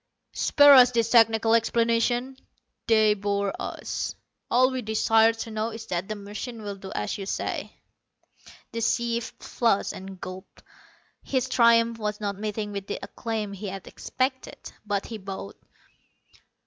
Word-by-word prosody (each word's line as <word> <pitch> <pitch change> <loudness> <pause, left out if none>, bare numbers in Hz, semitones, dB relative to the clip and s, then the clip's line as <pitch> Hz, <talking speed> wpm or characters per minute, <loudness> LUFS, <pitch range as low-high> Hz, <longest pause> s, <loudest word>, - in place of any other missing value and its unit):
"Spare 285 0 +6
us 250 -2 +8
these 230 -2 0
technical 225 -1 +5
explanations. 235 +3 +1 0.5
They 220 -2 +5
bore 200 -1 -1
us. - - -4 0.3
All 255 +2 +4
we 260 -1 -3
desire 220 0 +3
to 225 0 -7
know 215 +1 -2
is 225 0 -8
that 175 +2 -3
the 215 - -4
machine 210 +3 -7
will 205 -1 -5
do 190 0 -10
as 105 - -3
you 195 - -6
say." - - -4 1.0
The 230 - -4
chief 235 +1 0
flushed, 230 -5 0
and 190 0 -9
gulped. 185 +2 -10 0.6
His 260 -2 -1
triumph 230 -2 +4
was 210 -1 -3
not 200 -2 -3
meeting 210 0 -3
with 200 -1 -6
the - - -3
acclaim 215 0 -4
he 200 +1 -6
had 195 -1 -7
expected. 260 0 -3 0.3
But 200 -1 -1
he 225 -2 -7
bowed. 190 - -7
220 Hz, 150 wpm, -26 LUFS, 200-235 Hz, 1.0 s, us